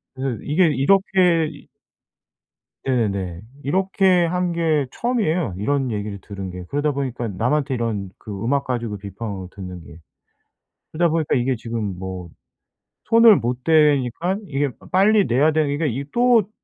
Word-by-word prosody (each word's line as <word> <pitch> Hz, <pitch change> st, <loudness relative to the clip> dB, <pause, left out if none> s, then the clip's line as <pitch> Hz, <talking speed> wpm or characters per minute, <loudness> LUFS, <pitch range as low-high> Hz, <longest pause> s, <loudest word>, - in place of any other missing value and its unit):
그래서 130 Hz, -3 st, -3 dB
이게 165 Hz, +4 st, +3 dB
이렇게 170 Hz, +2 st, +3 dB
이 145 Hz, -, -15 dB, 1.2 s
네네네. 100 Hz, -9 st, -1 dB, 0.2 s
이렇게 185 Hz, +2 st, +2 dB
한 180 Hz, +1 st, -1 dB
게 160 Hz, -4 st, +1 dB
처음이에요. 180 Hz, -, -1 dB
이런 130 Hz, +5 st, 0 dB
얘기를 105 Hz, -2 st, -4 dB
들은 95 Hz, -2 st, -7 dB
게. 90 Hz, 0 st, -7 dB
그러다 145 Hz, +1 st, 0 dB
보니까 130 Hz, -4 st, -3 dB
남한테 135 Hz, +8 st, 0 dB
이런 110 Hz, -6 st, -2 dB
그 100 Hz, -1 st, -7 dB
음악 140 Hz, +3 st, 0 dB
가지고 120 Hz, -5 st, -3 dB
비판을 100 Hz, -1 st, -6 dB
듣는 90 Hz, -2 st, -8 dB
게. 75 Hz, +2 st, -13 dB, 0.9 s
그러다 170 Hz, +2 st, +1 dB
보니까 155 Hz, -3 st, +1 dB
이게 125 Hz, +1 st, +1 dB
지금 110 Hz, -4 st, -4 dB
뭐 95 Hz, -1 st, -6 dB, 0.8 s
손을 230 Hz, -1 st, +7 dB
못 125 Hz, -3 st, -2 dB
대니깐 155 Hz, -, +2 dB
이게 140 Hz, 0 st, 0 dB
빠 -, -, -16 dB
빨리 200 Hz, +2 st, +4 dB
내야 140 Hz, +6 st, +3 dB
되는 150 Hz, -2 st, 0 dB
게 160 Hz, 0 st, 0 dB
이게 135 Hz, +1 st, -2 dB
또 240 Hz, -4 st, +4 dB
135 Hz, 300 characters per minute, -21 LUFS, 105-170 Hz, 1.2 s, 손을